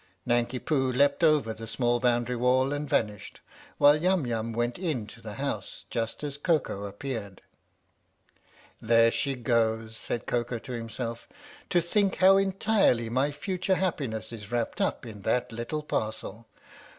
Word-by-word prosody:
Nanki 120 Hz, +1 st, +1 dB
Poo 130 Hz, -1 st, 0 dB
leapt 140 Hz, +5 st, +2 dB
over 150 Hz, -8 st, +4 dB
the 115 Hz, +1 st, -9 dB
small 120 Hz, +1 st, +1 dB
boundary 120 Hz, 0 st, +1 dB
wall 130 Hz, +3 st, +2 dB
and 145 Hz, 0 st, -3 dB
vanished, 105 Hz, -4 st, -1 dB, 0.4 s
while 145 Hz, +1 st, +7 dB
Yum 180 Hz, -4 st, +2 dB
Yum 115 Hz, -1 st, -2 dB
went 120 Hz, +4 st, -1 dB
into 145 Hz, -, -3 dB
the -, -, -7 dB
house -, -, -4 dB
just 115 Hz, +4 st, -3 dB
as 145 Hz, -1 st, -4 dB
Koko 145 Hz, -, 0 dB
appeared. 100 Hz, -1 st, -6 dB, 1.4 s
"There 115 Hz, 0 st, +5 dB
she 135 Hz, +2 st, 0 dB
goes," 115 Hz, -2 st, 0 dB
said 110 Hz, +1 st, -4 dB
Koko 120 Hz, 0 st, -1 dB
to 120 Hz, +3 st, -9 dB
himself. 115 Hz, 0 st, -5 dB, 0.4 s
"To 175 Hz, -, +4 dB
think 195 Hz, +3 st, +1 dB
how 190 Hz, +1 st, +6 dB
entirely 195 Hz, -, +2 dB
my 130 Hz, +4 st, +1 dB
future 185 Hz, +5 st, -1 dB
happiness 135 Hz, -, -2 dB
is 105 Hz, -1 st, -9 dB
wrapped 120 Hz, -1 st, -1 dB
up -, -, -1 dB
in 105 Hz, -3 st, -9 dB
that 120 Hz, +5 st, 0 dB
little 120 Hz, +7 st, -4 dB
parcel! 110 Hz, -3 st, -4 dB
120 Hz, 150 wpm, -28 LUFS, 115-145 Hz, 1.4 s, while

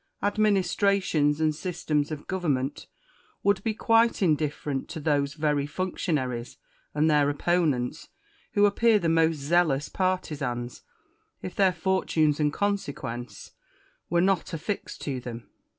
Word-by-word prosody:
Administrations 200 Hz, -6 st, +2 dB
and 155 Hz, -1 st, +2 dB
systems 150 Hz, -3 st, -2 dB
of 155 Hz, -2 st, -6 dB
government 145 Hz, -7 st, -2 dB, 0.6 s
would 200 Hz, -1 st, +2 dB
be 220 Hz, -1 st, -1 dB
quite 230 Hz, +1 st, +4 dB
indiflferent 150 Hz, -4 st, 0 dB
to 165 Hz, -, -6 dB
those 145 Hz, -2 st, 0 dB
very 150 Hz, -2 st, 0 dB
functionaries 145 Hz, -8 st, -3 dB, 0.4 s
and 150 Hz, +1 st, +3 dB
their 150 Hz, -2 st, +4 dB
opponents, 145 Hz, -5 st, 0 dB, 0.4 s
who 205 Hz, -, +5 dB
appear 220 Hz, +2 st, +4 dB
the 170 Hz, -, -1 dB
most 165 Hz, 0 st, +3 dB
zealous 150 Hz, -1 st, +1 dB
partisans, 145 Hz, -10 st, -2 dB, 0.6 s
if 185 Hz, -, -6 dB
their 195 Hz, -2 st, +4 dB
fortunes 160 Hz, -4 st, +1 dB
and 150 Hz, -1 st, +2 dB
consequence 140 Hz, -, -4 dB, 0.6 s
were 170 Hz, 0 st, +2 dB
not 190 Hz, -3 st, +1 dB
affixed 165 Hz, +6 st, -4 dB
to 135 Hz, -3 st, -3 dB
them. 120 Hz, -1 st, -8 dB
155 Hz, 120 wpm, -27 LUFS, 145-185 Hz, 0.6 s, who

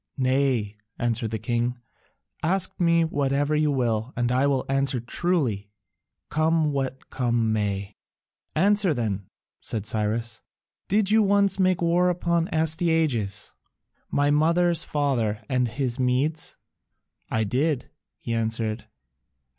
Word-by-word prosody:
"Nay," 130 Hz, -5 st, +1 dB, 0.2 s
answered 115 Hz, -1 st, -1 dB
the 110 Hz, -, -2 dB
king, 120 Hz, +3 st, -1 dB, 0.6 s
"ask 185 Hz, +2 st, +1 dB
me 170 Hz, -1 st, +4 dB
whatever 145 Hz, -1 st, 0 dB
you 150 Hz, 0 st, +2 dB
will, 120 Hz, -3 st, 0 dB
and 120 Hz, 0 st, +1 dB
I 130 Hz, +3 st, +3 dB
will 135 Hz, -2 st, 0 dB
answer 135 Hz, -1 st, +1 dB
truly, 120 Hz, -, -1 dB, 0.6 s
come 155 Hz, 0 st, +1 dB
what 135 Hz, -1 st, -4 dB
come 120 Hz, -3 st, +1 dB
may." 100 Hz, -1 st, -2 dB, 0.6 s
"Answer 195 Hz, 0 st, +3 dB
then," 105 Hz, -5 st, -2 dB, 0.3 s
said 110 Hz, -3 st, -3 dB
Cyrus, 110 Hz, +2 st, -1 dB, 0.5 s
"did 205 Hz, 0 st, +3 dB
you 220 Hz, +1 st, +5 dB
once 200 Hz, -1 st, +3 dB
make 185 Hz, -2 st, +2 dB
war 175 Hz, +2 st, +3 dB
upon 170 Hz, -1 st, 0 dB
Astyages, 160 Hz, -, 0 dB, 0.6 s
my 145 Hz, 0 st, +2 dB
mother's 170 Hz, +3 st, +3 dB
father, 125 Hz, -8 st, -1 dB
and 125 Hz, -2 st, +1 dB
his 125 Hz, +1 st, -2 dB
Medes?" 130 Hz, +5 st, 0 dB, 0.7 s
"I 110 Hz, -, +1 dB
did," 130 Hz, +5 st, -1 dB, 0.3 s
he 115 Hz, -, -4 dB
answered. 110 Hz, 0 st, -1 dB
135 Hz, 120 wpm, -25 LUFS, 115-160 Hz, 0.7 s, you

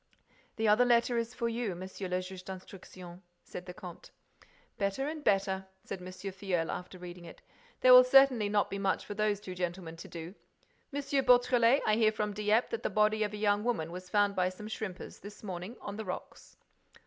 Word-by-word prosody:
"The 220 Hz, 0 st, 0 dB
other 210 Hz, +4 st, +5 dB
letter 240 Hz, 0 st, +3 dB
is 230 Hz, +1 st, -4 dB
for 235 Hz, -, -1 dB
you, 230 Hz, -5 st, -2 dB
Monsieur 185 Hz, +2 st, -6 dB
le 180 Hz, 0 st, -1 dB
Juge 185 Hz, 0 st, -9 dB
d'Instruction," 185 Hz, -1 st, -10 dB, 0.2 s
said 180 Hz, -, -9 dB
the 180 Hz, -, -6 dB
comte. 180 Hz, -5 st, -10 dB, 0.7 s
"Better 200 Hz, +7 st, -1 dB
and 305 Hz, 0 st, -5 dB
better," 195 Hz, -3 st, +1 dB, 0.2 s
said 190 Hz, -, -6 dB
M. 180 Hz, -, -8 dB
Filleul, 185 Hz, -2 st, -3 dB
after 180 Hz, +1 st, -6 dB
reading 175 Hz, -1 st, -9 dB
it. -, -, -13 dB, 0.4 s
"There 255 Hz, -, +8 dB
will 250 Hz, 0 st, +11 dB
certainly 255 Hz, -4 st, +5 dB
not 205 Hz, 0 st, +1 dB
be 200 Hz, -, -3 dB
much 195 Hz, -1 st, 0 dB
for -, -, -5 dB
those 210 Hz, -1 st, 0 dB
two 185 Hz, -3 st, -7 dB
gentlemen 175 Hz, -2 st, -4 dB
to 170 Hz, -, -9 dB
do. 170 Hz, +1 st, -8 dB, 0.6 s
M. 285 Hz, 0 st, -3 dB, 0.2 s
Beautrelet, 245 Hz, 0 st, +5 dB
I 215 Hz, 0 st, +3 dB
hear 220 Hz, -2 st, +4 dB
from 210 Hz, -1 st, -2 dB
Dieppe 210 Hz, +3 st, +2 dB
that 460 Hz, -, -3 dB
the -, -, -1 dB
body 215 Hz, 0 st, +2 dB
of 210 Hz, -1 st, 0 dB
a -, -, -4 dB
young 205 Hz, 0 st, +2 dB
woman 220 Hz, -10 st, -1 dB
was 180 Hz, +1 st, -8 dB
found 205 Hz, 0 st, +2 dB
by 185 Hz, 0 st, +2 dB
some 195 Hz, +3 st, -9 dB
shrimpers, 210 Hz, -4 st, -6 dB
this 205 Hz, +2 st, -11 dB
morning, 185 Hz, +3 st, -6 dB
on 200 Hz, 0 st, -7 dB
the 220 Hz, -, -5 dB
rocks." 185 Hz, -, -8 dB
205 Hz, 200 wpm, -31 LUFS, 185-225 Hz, 0.7 s, will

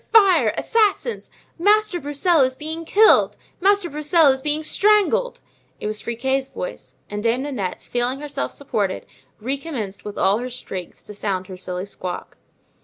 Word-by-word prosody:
fire! 370 Hz, -, +6 dB
assassins! 455 Hz, +1 st, +1 dB, 0.3 s
Master 415 Hz, 0 st, +3 dB
Broussel 295 Hz, +3 st, +2 dB
is 260 Hz, 0 st, +2 dB
being 320 Hz, +4 st, -6 dB
killed! 435 Hz, +6 st, +5 dB, 0.2 s
Master 400 Hz, 0 st, +3 dB
Broussel 300 Hz, 0 st, +4 dB
is 265 Hz, -, -6 dB
being 300 Hz, +2 st, -1 dB
strangled." 420 Hz, +7 st, +2 dB, 0.4 s
It -, -, -6 dB
was 210 Hz, 0 st, -2 dB
Friquet's 265 Hz, +3 st, -1 dB
voice; -, -, -7 dB
and 210 Hz, 0 st, -5 dB
Dame 235 Hz, +4 st, +1 dB
Nanette, 250 Hz, -11 st, -3 dB
feeling 245 Hz, +2 st, -1 dB
herself 295 Hz, -1 st, -4 dB
supported, 215 Hz, -9 st, -2 dB, 0.3 s
recommenced 255 Hz, -5 st, -4 dB
with 210 Hz, -, -7 dB
all 195 Hz, +3 st, +3 dB
her 250 Hz, +1 st, -4 dB
strength 195 Hz, -8 st, -8 dB
to 210 Hz, -, -7 dB
sound 195 Hz, -2 st, -2 dB
her 185 Hz, -, -9 dB
shrilly 180 Hz, 0 st, -5 dB
squawk. 185 Hz, -3 st, -7 dB
270 Hz, 150 wpm, -22 LUFS, 210-345 Hz, 0.4 s, fire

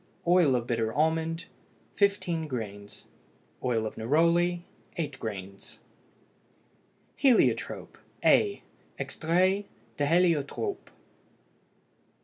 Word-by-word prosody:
Oil 175 Hz, -7 st, +5 dB
of 120 Hz, -1 st, -1 dB
bitter 115 Hz, -2 st, -1 dB
almond 160 Hz, +3 st, 0 dB, 0.5 s
15 180 Hz, -5 st, +1 dB
grains. 105 Hz, -6 st, -7 dB, 0.6 s
Oil 115 Hz, -3 st, 0 dB
of 110 Hz, -, -6 dB
neroli 170 Hz, +8 st, +2 dB, 0.4 s
8 145 Hz, -5 st, -3 dB
grains. 100 Hz, -3 st, -7 dB, 1.4 s
HELIOTROPE, 260 Hz, -4 st, +2 dB, 0.3 s
A 405 Hz, -1 st, +4 dB, 0.3 s
(EXTRAIT 185 Hz, +5 st, +1 dB, 0.3 s
DE 145 Hz, -, 0 dB
HÉLIOTROPE). 170 Hz, -, +1 dB
160 Hz, 80 wpm, -28 LUFS, 120-175 Hz, 1.4 s, Oil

